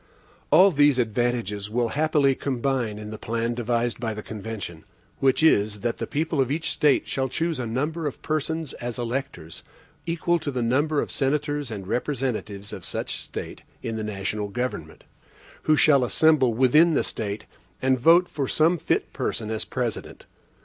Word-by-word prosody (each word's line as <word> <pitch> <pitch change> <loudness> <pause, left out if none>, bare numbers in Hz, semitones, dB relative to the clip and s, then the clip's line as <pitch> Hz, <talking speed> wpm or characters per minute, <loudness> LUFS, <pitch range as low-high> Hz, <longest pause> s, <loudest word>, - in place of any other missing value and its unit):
All 195 +1 +7
these 145 -3 +4
advantages 115 -3 -1
will 120 +1 0
happily 145 0 +2
combine 130 -5 -1
in 105 0 -7
the 110 - -7
plan 115 +1 -1
devised 120 0 -1
by 115 -2 -2
the 105 - -6
convention; 105 -6 -6 0.4
which 135 +3 +2
is, 105 -9 +3
that 120 0 -1
the - - -4
people 155 -1 0
of 130 - 0
each 160 +2 -1
State 145 -2 +2
shall 130 -1 -1
choose 160 +3 -1
a 120 - -2
number 150 +7 -2
of 140 - -5
persons 155 0 -2
as 120 -1 -5
electors, 120 - -4 0.5
equal 170 +1 +1
to 150 - -4
the 125 -3 -2
number 145 +5 +2
of - - -6
senators 145 0 -1
and 100 -4 -6
representatives 110 -5 -3
of - - -7
such - - -4
State - - -7 0.2
in 115 - -3
the 110 - -3
national 105 0 -3
government, 120 +2 -4 0.6
who 155 - +5
shall 145 -3 +5
assemble 140 0 +4
within 140 +8 +4
the - - +2
State, 105 -1 -4 0.3
and 130 -1 +2
vote 170 +7 +6
for 140 -5 -3
some 165 +5 +2
fit - - -1
person 110 -1 -3
as 110 - -2
President. 120 -4 -4
125 Hz, 170 wpm, -25 LUFS, 110-150 Hz, 0.6 s, All